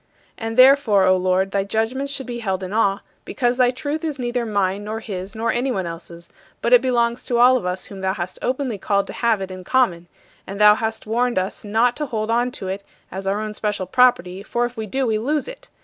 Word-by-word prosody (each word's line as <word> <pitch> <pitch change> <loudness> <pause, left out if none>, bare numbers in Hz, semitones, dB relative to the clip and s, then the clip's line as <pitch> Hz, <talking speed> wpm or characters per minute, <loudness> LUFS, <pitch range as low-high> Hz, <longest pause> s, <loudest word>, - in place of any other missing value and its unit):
And 225 +1 -5
therefore, 255 -6 +6
O 185 0 +5
Lord, 185 +1 +1
thy 195 0 0
judgments 225 +7 -2
should 275 -1 -4
be 240 -1 -5
held 190 -4 -2
in 185 +2 -5
awe, 200 -3 +1 0.2
because 245 -1 -1
thy 250 -1 +4
truth 290 +5 -4
is 305 -3 -3
neither 240 -1 -2
mine 200 -1 0
nor 220 +1 -4
his 195 -2 -6
nor 225 +1 0
anyone 240 -6 -1
else's; 170 0 -9 0.3
but 235 - +1
it 245 - +8
belongs 240 -2 0
to 240 - 0
all 250 +2 +6
of 235 -8 -1
us 180 +1 -3
whom 195 - -10
thou 190 0 -1
hast 185 -1 -5
openly 255 -4 -2
called 200 +1 +1
to - - -8
have 230 -4 +1
it 190 0 -5
in 185 0 -8
common; 180 -7 +1 0.4
and 195 +1 -6
thou 210 0 +8
hast 220 +1 -3
warned 240 +2 0
us 185 +1 -2
not 225 +4 +2
to 300 - -3
hold 220 -3 -2
on 240 +2 +2
to 195 -6 -7
it 195 +2 -4 0.3
as 195 +1 -6
our 200 +2 0
own 215 0 -4
special 210 -3 -2
property, 190 -4 +2
for 240 +4 -1
if 240 0 -6
we 220 -2 -5
do 265 +5 -1
we 220 -2 0
lose 290 +6 -1
it. - - -11
220 Hz, 235 wpm, -21 LUFS, 195-245 Hz, 0.4 s, it